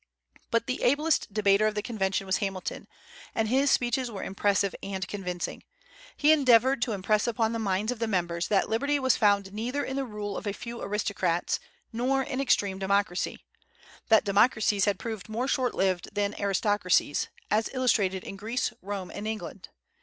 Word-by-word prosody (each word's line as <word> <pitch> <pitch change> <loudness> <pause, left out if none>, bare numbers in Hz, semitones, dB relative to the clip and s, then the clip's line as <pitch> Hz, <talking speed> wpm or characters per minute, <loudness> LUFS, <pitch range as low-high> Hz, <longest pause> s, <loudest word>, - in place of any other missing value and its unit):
But 230 0 +1
the 255 - -3
ablest 295 0 +2
debater 205 0 +3
of 215 - -2
the 210 - -2
convention 195 -4 -1
was 190 0 +1
Hamilton, 195 -2 -4 0.5
and 225 -1 +1
his 270 +5 +3
speeches 245 0 +1
were 205 -4 -6
impressive 200 0 +1
and 190 -2 -4
convincing. 180 -3 -4 0.6
He 295 +1 +5
endeavored 260 -3 +5
to 235 - 0
impress 210 +3 +1
upon 225 -1 0
the 230 - -2
minds 205 +1 0
of 250 - -5
the 230 - 0
members 175 -4 -1
that 200 -2 +2
liberty 280 +6 +1
was 260 -2 +3
found 200 -2 +2
neither 245 +7 -2
in 265 - -4
the 275 - 0
rule 210 -3 -5
of - - -6
a 200 - -1
few 235 +2 -7
aristocrats, 195 -4 -1 0.3
nor 260 +4 +1
in 260 +1 -3
extreme 200 -7 +1
democracy; 200 -1 -1 0.6
that 220 -1 +6
democracies 205 0 +3
had 205 -2 +1
proved 220 -2 -6
more 235 +4 -2
short 255 -2 0
lived 185 -2 0
than 205 0 0
aristocracies, 200 -5 +1 0.2
as 220 +1 +2
illustrated 205 -8 +1
in 195 - -7
Greece, 225 +5 -2
Rome, 195 -1 -5
and 205 +1 -5
England. 220 -1 -6
210 Hz, 175 wpm, -28 LUFS, 195-240 Hz, 0.6 s, that